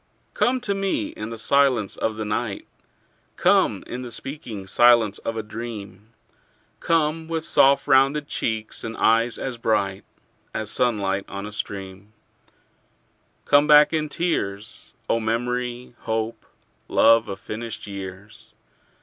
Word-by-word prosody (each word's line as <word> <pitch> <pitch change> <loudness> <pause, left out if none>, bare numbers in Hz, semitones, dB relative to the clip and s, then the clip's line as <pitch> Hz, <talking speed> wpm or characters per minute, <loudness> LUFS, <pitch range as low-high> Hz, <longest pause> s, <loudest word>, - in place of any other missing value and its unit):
Come 255 +1 +1
to 200 -5 +1
me 195 - -1
in 105 +1 -7
the 115 - -6
silence 125 -4 +2
of 110 - -2
the 110 0 -4
night; 105 -1 -3 0.7
Come - - +3
in 125 - -6
the 125 - -7
speaking 120 -6 -3
silence 115 0 +4
of 115 - -4
a 110 - -2
dream; 105 -2 -8 0.7
Come 160 0 0
with 165 -1 -3
soft 140 +1 +4
rounded 140 +2 +3
cheeks 110 -5 -3
and 115 0 -5
eyes 115 +1 +3
as 130 -3 -5
bright 100 -4 0 0.5
As 110 -1 -3
sunlight 100 -5 0
on 100 +1 -6
a 105 - -7
stream; 100 0 -6 1.3
Come 145 +1 +4
back 150 +1 +7
in 155 -1 0
tears, 110 - -3 0.2
O 115 - +1
memory, 120 +2 -2
hope, 110 0 -3 0.4
love 115 0 +4
of 95 -1 -5
finished 110 +2 -6
years. 100 +1 -9
115 Hz, 130 wpm, -23 LUFS, 105-135 Hz, 1.3 s, back